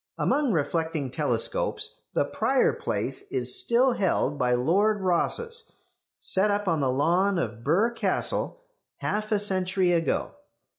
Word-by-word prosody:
Among 285 -4 +1
reflecting 160 - -1
telescopes 485 - -1
the - - +2
prior - - +1
place - - -3
is 385 0 +2
still 255 -6 +3
held 185 -8 0
by 125 -1 +2
Lord 200 - +2
Rosse's, 460 - -1 0.5
set 195 +2 +2
up 205 0 -1
on 165 -3 +1
the 135 -2 +1
lawn 175 +9 +2
of 115 -7 -3
Birr 185 - +2
Castle 370 - -1 0.3
half 215 +1 -3
a 210 - +3
century 190 -2 +1
ago. 165 -1 0
190 Hz, 135 wpm, -26 LUFS, 160-235 Hz, 0.5 s, still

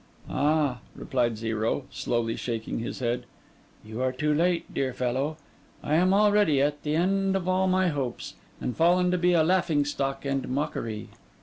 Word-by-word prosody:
'Ah!' 145 -3 +1 0.2
replied 120 -5 -1
Zero, 110 +4 -1
slowly 115 -1 -1
shaking 115 -2 -3
his 115 - -4
head. 120 0 -1 0.6
'You 110 +3 -5
are 130 0 +1
too 150 +4 0
late, 170 +3 0
dear 130 -2 -1
fellow! 130 +5 -1 0.5
I 150 - -1
am 180 +4 +4
already 205 -7 +4
at 145 +1 +1
the 150 0 -1
end 195 +3 +1
of 185 -2 -2
all 185 +1 +2
my 185 0 +3
hopes, 135 -6 -4 0.3
and 125 - -3
fallen 180 +2 +3
to 180 - +1
be 180 0 +3
a 165 -2 +4
laughing 165 -4 +2
stock 135 -1 -3
and 135 -1 -1
mockery. 115 -5 -3
145 Hz, 170 wpm, -27 LUFS, 125-180 Hz, 0.6 s, am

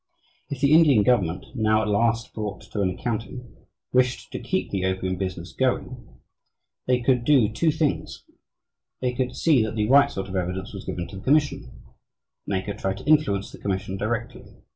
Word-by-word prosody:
If 140 -3 -5
the 140 +1 +4
Indian 150 -9 +6
government, 95 -8 +1
now 110 -3 +2
at - - -2
last 115 +2 +1
brought 105 -3 -5
to 105 - -5
an 95 - +2
accounting, 115 +5 -5 0.4
wished 125 0 +1
to - - -4
keep - - -2
the 95 -2 -1
opium 95 0 -1
business 90 -2 -5
going, 130 -1 -2 0.7
they 125 -1 +2
could 125 0 +2
do 130 -4 +4
two 165 +7 +2
things 155 -1 -1 0.8
they 125 -1 -1
could 125 0 -2
see 150 -7 +3
that 110 0 -2
the 105 -1 0
"right" 140 +3 +6
sort 95 -7 -5
of 95 - -6
evidence 95 +2 -3
was 100 - -8
given 90 -1 -4
to 95 - -9
the 95 - -10
commission, 145 +1 +2 0.8
and 100 - -1
they 95 - -3
could 100 - -6
try 95 0 -1
to 95 - -11
influence 150 -11 +2
the - - -12
commission 95 -1 -3
directly. 115 +4 -4
110 Hz, 185 wpm, -24 LUFS, 95-130 Hz, 0.8 s, Indian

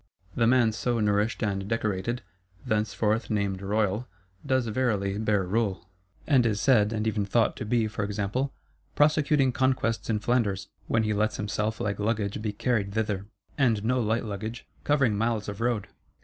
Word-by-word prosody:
The 115 - +2
man 120 -2 +4
so 120 +2 -1
nourished 105 +2 +1
and 100 -2 -1
decorated, 110 +1 -1 0.4
thenceforth 110 +1 0
named 100 -3 -1
royal, 105 +3 0 0.4
does 130 -2 +1
verily 105 -4 0
bear 105 -3 +1
rule; 95 -3 -1 0.4
and 135 -5 +4
is 110 -3 +1
said, 110 -5 +4
and 110 -1 -1
even 110 -2 0
thought, 110 +3 +2
to - - -4
be, 115 0 +1
for 110 0 -3
example, 105 +7 -1 0.4
"prosecuting 150 -2 +3
conquests 130 -3 0
in 110 - +2
Flanders," 105 -4 0 0.2
when 115 - +2
he 110 0 0
lets 110 +1 0
himself 105 +1 -2
like 105 -3 -2
luggage 105 -1 -1
be 105 -1 -1
carried 105 -2 -1
thither: 105 -3 -1 0.3
and 115 -6 +3
no 125 +2 +2
light 110 +1 0
luggage; 110 +3 -5 0.2
covering 135 -7 +2
miles 110 0 0
of 100 +1 -5
road. 115 -4 0
110 Hz, 165 wpm, -27 LUFS, 105-120 Hz, 0.4 s, man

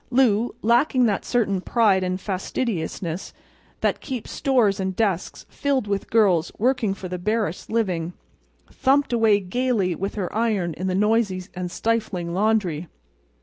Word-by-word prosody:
Lou, 240 -3 +2
lacking 245 +3 +3
that 205 -4 0
certain 205 -6 0
pride 200 -4 +3
and 185 0 -1
fastidiousness 185 -3 -3 0.5
that - - 0
keeps 255 -5 -5
stores 230 -7 +2
and 190 -1 -2
desks 195 -5 -1
filled 275 -5 -1
with 200 -1 -2
girls 190 -7 +3
working 225 -4 +1
for 190 - -7
the 180 0 -5
barest 210 -2 -2
living, 180 -7 -1 0.6
thumped 275 0 +2
away 220 -3 +4
gaily 205 -1 0
with 195 +4 -4
her 195 -3 -3
iron 210 -7 0
in 185 +4 -4
the 185 - 0
noisy 210 -2 +1
and 180 -1 -4
stifling 190 -4 -1
laundry. 190 -5 +1
205 Hz, 145 wpm, -23 LUFS, 185-230 Hz, 0.6 s, away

